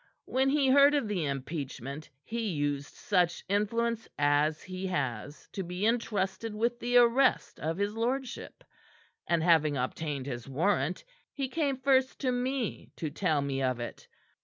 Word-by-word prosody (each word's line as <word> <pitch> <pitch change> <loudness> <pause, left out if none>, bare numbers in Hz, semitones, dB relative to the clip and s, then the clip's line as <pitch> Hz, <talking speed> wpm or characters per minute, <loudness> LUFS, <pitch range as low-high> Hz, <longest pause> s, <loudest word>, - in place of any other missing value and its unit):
"When 265 +1 +1
he 280 -1 +3
heard 280 +2 +7
of 280 -6 +1
the 185 -7 -1
impeachment, 140 0 -5
he 230 -1 -3
used 145 -1 -2
such 180 -4 +1
influence 225 +3 0
as 145 +2 +2
he 185 0 -5
has 145 -5 -3
to 195 - -4
be 180 +2 -3
entrusted 220 -2 -1
with 235 +2 0
the 245 0 +2
arrest 245 +2 +4
of 160 +2 -2
his 200 +1 0
lordship; 250 +3 -3 0.6
and 170 -2 +2
having 155 -4 +4
obtained 140 +1 -3
his 120 -2 -6
warrant, 160 +2 0 0.3
he 275 -2 -3
came 280 -1 0
first 265 0 +2
to 260 -2 +1
me 250 -1 -2
to 155 -3 -4
tell 155 -3 +1
me 135 -1 -2
of 130 -2 0
it. 120 - -7
190 Hz, 155 wpm, -30 LUFS, 145-240 Hz, 0.6 s, heard